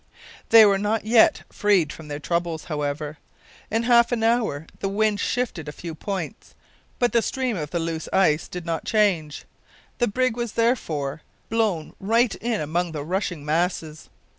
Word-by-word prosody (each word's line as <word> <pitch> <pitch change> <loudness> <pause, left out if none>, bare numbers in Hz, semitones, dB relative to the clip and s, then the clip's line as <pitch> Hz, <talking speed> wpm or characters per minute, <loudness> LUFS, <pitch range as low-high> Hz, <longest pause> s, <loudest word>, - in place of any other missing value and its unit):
They 225 -1 +9
were 200 -1 +3
not 210 +1 -1
yet 225 0 +4
freed 195 -7 +2
from 160 - -11
their 145 -1 -4
troubles, 170 +1 -2
however. 150 -1 -4 0.5
In 225 +1 0
half 235 0 +5
an 235 -2 0
hour 225 -10 +1
the 195 - -2
wind 210 +1 +1
shifted 230 -12 -2
a - - -4
few 165 +2 -7
points, 190 +3 -6 0.4
but 245 -1 +2
the 235 - +3
stream 255 -1 -1
of 150 -5 -4
the 175 - -2
loose 165 -1 -3
ice 160 -5 +3
did 180 -2 -7
not 165 -2 -2
change. 185 -9 +1 0.5
The 240 - +3
brig 255 +2 0
was, 240 -2 -3
therefore, 160 - 0 0.3
blown 215 -8 0
right 225 +2 +2
in 230 -2 -2
among 165 +3 -1
the 150 -2 -4
rushing 175 -2 -3
masses. 160 -1 -2
190 Hz, 165 wpm, -24 LUFS, 155-225 Hz, 0.5 s, They